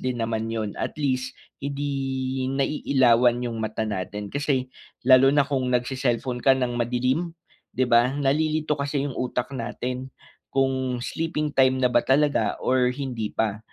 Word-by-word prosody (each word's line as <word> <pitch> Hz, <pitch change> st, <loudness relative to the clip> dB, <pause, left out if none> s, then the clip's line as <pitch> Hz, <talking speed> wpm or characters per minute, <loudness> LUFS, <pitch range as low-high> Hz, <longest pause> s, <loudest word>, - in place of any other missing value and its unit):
din 130 Hz, -1 st, -2 dB
naman 110 Hz, -1 st, -2 dB
'yon 110 Hz, -2 st, -3 dB
at -, -, -3 dB
least 130 Hz, -3 st, -1 dB, 0.2 s
hindi 135 Hz, -2 st, -2 dB
naiilawan 125 Hz, -4 st, +3 dB
yung 120 Hz, -2 st, -3 dB
mata 110 Hz, 0 st, -2 dB
natin. 105 Hz, -1 st, -4 dB
Kasi 135 Hz, -3 st, -1 dB, 0.3 s
lalo 130 Hz, +1 st, +6 dB
na 145 Hz, -, +5 dB
kung 135 Hz, -2 st, -1 dB
nagse-cellphone 125 Hz, 0 st, -1 dB
ka 135 Hz, +2 st, +4 dB
ng 125 Hz, -2 st, -1 dB
madilim 125 Hz, +8 st, 0 dB, 0.4 s
'di 130 Hz, -, +1 dB
ba? 120 Hz, +3 st, +4 dB
Nalilito 150 Hz, +2 st, 0 dB
kasi 140 Hz, 0 st, -1 dB
yung 140 Hz, -2 st, -4 dB
utak 125 Hz, 0 st, -2 dB
natin 125 Hz, 0 st, -4 dB, 0.5 s
kung 130 Hz, -2 st, 0 dB
sleeping 155 Hz, +1 st, -2 dB
time 130 Hz, -1 st, +3 dB
na 125 Hz, -, +4 dB
ba 120 Hz, -, +4 dB
talaga 145 Hz, +2 st, +2 dB
or 125 Hz, -1 st, +2 dB
hindi 125 Hz, -5 st, -3 dB
pa 105 Hz, -2 st, 0 dB
130 Hz, 150 wpm, -24 LUFS, 120-140 Hz, 0.5 s, lalo